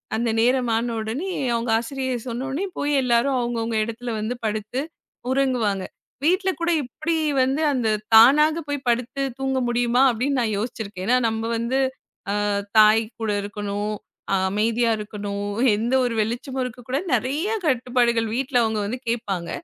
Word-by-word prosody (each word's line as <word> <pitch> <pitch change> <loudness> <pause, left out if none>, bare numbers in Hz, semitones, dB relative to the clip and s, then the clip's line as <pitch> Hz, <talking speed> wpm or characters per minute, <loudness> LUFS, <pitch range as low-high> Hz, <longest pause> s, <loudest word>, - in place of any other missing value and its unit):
அந்த 235 +1 0
நேரம் 250 +1 +2
ஆன 230 +1 -1
உடனே 235 - -3 0.2
அவுங்க 230 0 -1
ஆசிரியர் 255 0 -4
சொன்னவுடனே 270 +8 -3
போய் 290 0 0
எல்லாரும் 250 +2 +2
அவுங்க, 240 -1 -2
அவுங்க 225 0 -2
எடத்துல 230 +2 -5
வந்து 220 +4 -2
படுத்து 215 +3 -2 0.5
உறங்குவாங்க. 250 -8 +1 0.4
வீட்ல 370 +5 +2
கூட 340 +1 +1
இப்பிடி 310 +6 -3 0.3
வந்து 270 +4 0
அந்த 245 -4 0 0.2
தானாகப் 300 +8 +6
போய் 285 -2 -4
படுத்துத் 250 +2 -1
தூங்க 265 0 0
முடியுமா! 240 +1 +2
அப்பிடின்னு 255 +4 0
நான் 220 -3 0
யோசிச்சிருக்கேன். 210 -4 -5
ஏனா 250 - +4
நம்ம 225 0 -2
வந்து 235 +3 -1 0.7
அ. - - 0 0.3
தாய்கூட 220 +1 +4
இருக்கணும், 205 +1 -3 0.4
அ. - - +4 0.2
அமைதியா 225 +3 +1
இருக்கணும். 205 -1 -5 0.3
எந்த 235 +4 -1
ஒரு 240 -2 -1
வெளிச்சமும் 250 +4 -3
இருக்கக் 245 -1 -8
கூடாது. 275 +8 -1
நெறைய 270 - 0 0.2
கட்டுப்பாடுகள் 245 -3 +2
வீட்ல 255 0 +1
அவுங்க 220 -1 0
வந்து 245 +5 -4
கேப்பாங்க. 200 -8 -2
240 Hz, 145 wpm, -23 LUFS, 220-265 Hz, 0.7 s, தானாகப்